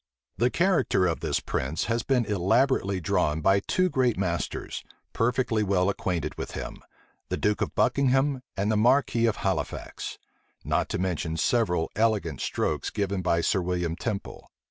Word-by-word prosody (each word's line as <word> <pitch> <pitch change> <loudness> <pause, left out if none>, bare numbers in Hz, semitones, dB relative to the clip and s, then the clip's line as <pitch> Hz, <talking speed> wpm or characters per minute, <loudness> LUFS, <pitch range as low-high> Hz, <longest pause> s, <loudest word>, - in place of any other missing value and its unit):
The 120 +2 +3
character 175 - +2
of 85 -2 0
this 80 -4 0
prince 70 +5 -2
has 115 0 0
been 125 -1 +1
elaborately 100 +1 +2
drawn 85 -3 +1
by 95 +5 +4
two 185 - +1
great 130 - +1
masters, 85 -3 -3 0.3
perfectly 115 -1 +1
well 95 -2 +2
acquainted 90 -5 -3
with - - -5
him, - - -6 0.5
the - - -1
duke 105 0 0
of - - -2
Buckingham 135 +1 +2 0.2
and 100 +2 +1
the 110 - +2
marquis 120 0 +3
of 110 - +1
Halifax; 95 -1 -3 0.5
not - - 0
to - - -1
mention 85 -3 -2
several 95 -6 +1
elegant 105 - +1
strokes - - -1
given 100 -2 -2
by 85 -2 +1
Sir 95 +3 +1
William 90 -2 -1
Temple. 100 +3 -5
100 Hz, 155 wpm, -27 LUFS, 90-120 Hz, 0.5 s, by